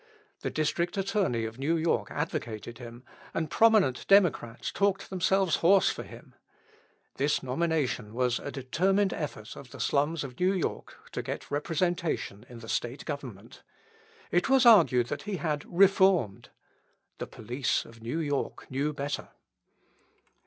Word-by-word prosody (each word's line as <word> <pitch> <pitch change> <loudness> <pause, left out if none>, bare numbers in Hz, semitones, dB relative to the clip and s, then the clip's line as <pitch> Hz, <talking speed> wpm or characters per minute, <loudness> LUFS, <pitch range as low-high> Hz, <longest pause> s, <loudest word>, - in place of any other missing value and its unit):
The - - -3
District 170 +4 -1
Attorney 195 - 0
of 110 +2 -7
New 160 +5 +1
York 165 +1 0
advocated 120 -7 -4
him, 120 0 -10 0.3
and 160 -2 -2
prominent 215 - +3
Democrats 175 - +3
talked 200 -1 0
themselves 190 -3 +2
hoarse 190 +3 +4
for - - -6
him. - - -13 0.8
This 145 +2 +1
nomination 135 -5 -1
was 125 -1 +1
a - - -6
determined 185 +10 +1
effort 120 -9 -6
of 130 - -11
the 140 - -11
slums 145 +6 +1
of 125 -3 -9
New 185 +2 +3
York 185 - -3
to - - -3
get - - -6
representation 160 - -2
in 120 -2 -11
the 115 - -10
State 120 +4 -3
Government. 130 -9 -7 0.7
It 175 +8 +2
was 265 -1 +5
argued 165 - +6
that - - -3
he 200 - -1
had 150 -4 -2
reformed. 190 - +3 0.7
The - - -4
police 120 +3 -2
of 115 0 -15
New 120 +8 -3
York 145 -4 -3
knew 140 +3 -1
better. 145 0 -4
150 Hz, 145 wpm, -28 LUFS, 125-180 Hz, 0.8 s, argued